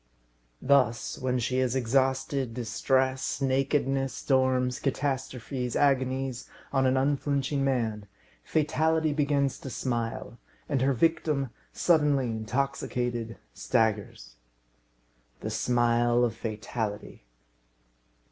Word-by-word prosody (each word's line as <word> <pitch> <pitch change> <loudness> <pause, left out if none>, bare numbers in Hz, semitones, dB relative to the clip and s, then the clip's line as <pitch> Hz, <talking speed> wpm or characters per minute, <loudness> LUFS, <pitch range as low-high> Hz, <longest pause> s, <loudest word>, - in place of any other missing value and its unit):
Thus, 130 -4 +2
when 130 0 0
she 125 +2 0
has 130 -1 +1
exhausted 130 0 0
distress, 130 +3 0
nakedness, 135 0 +1
storms, 130 -1 +1
catastrophes, 130 -2 -2
agonies 130 -2 0 0.2
on 135 -1 +3
an 130 +1 +2
unflinching 140 0 0
man, 115 -6 -1 0.4
Fatality 160 0 +1
begins 140 -2 +1
to 135 - -7
smile, 120 -1 -3 0.3
and 140 -3 0
her 135 +1 +3
victim, 140 -1 +1 0.2
suddenly 145 -7 +2
intoxicated, 120 0 -2 0.2
staggers. 105 - -1 1.0
The - - -4
smile 120 0 +2
of 120 -3 +1
Fatality! 110 - -5
130 Hz, 90 wpm, -28 LUFS, 120-140 Hz, 1.0 s, on